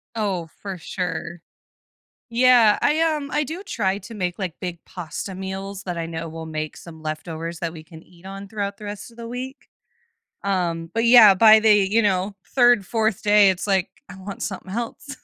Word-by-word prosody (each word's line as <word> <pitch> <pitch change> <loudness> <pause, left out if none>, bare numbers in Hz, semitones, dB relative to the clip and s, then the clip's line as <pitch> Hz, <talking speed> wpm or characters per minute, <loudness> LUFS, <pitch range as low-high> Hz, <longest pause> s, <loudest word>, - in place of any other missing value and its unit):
Oh, 195 -6 -2
for 195 -2 -5
sure. 175 -1 -5 0.9
Yeah 235 -2 +5
I, 305 +2 +2
um, 305 -3 0
I 300 - +1
do 320 +6 -6
try 200 - -1
to 230 - -11
make, 180 -2 -3
like, 180 -4 -3
big 175 -2 -4
pasta 180 +2 -6
meals 195 +1 -6
that 180 -3 -4
I 165 - -2
know 165 0 -5
will 160 0 -7
make 155 -1 -5
some 160 -2 -12
leftovers 160 +1 -5
that 165 -1 -3
we 160 -2 -10
can 160 0 -14
eat 175 0 -21
on 195 +1 -8
throughout 200 -1 -4
the 210 - -10
rest 205 +3 -7
of 230 - -20
the 230 - -7
week. 260 +3 -7 0.8
Um, 170 -4 -1
but, 230 0 +1
yeah, 230 -4 +9
by 220 +3 +8
the, 215 -1 +6
you 205 +2 +3
know, 200 -1 0 0.2
3rd, 240 -6 +5
4th 220 -2 0
day, 205 -1 +6
it's 185 +1 -3
like, 190 -2 +1 0.2
I - - -10
want 195 +1 -8
something 190 -2 -5
else. 235 +6 -5
195 Hz, 195 wpm, -23 LUFS, 175-225 Hz, 0.9 s, yeah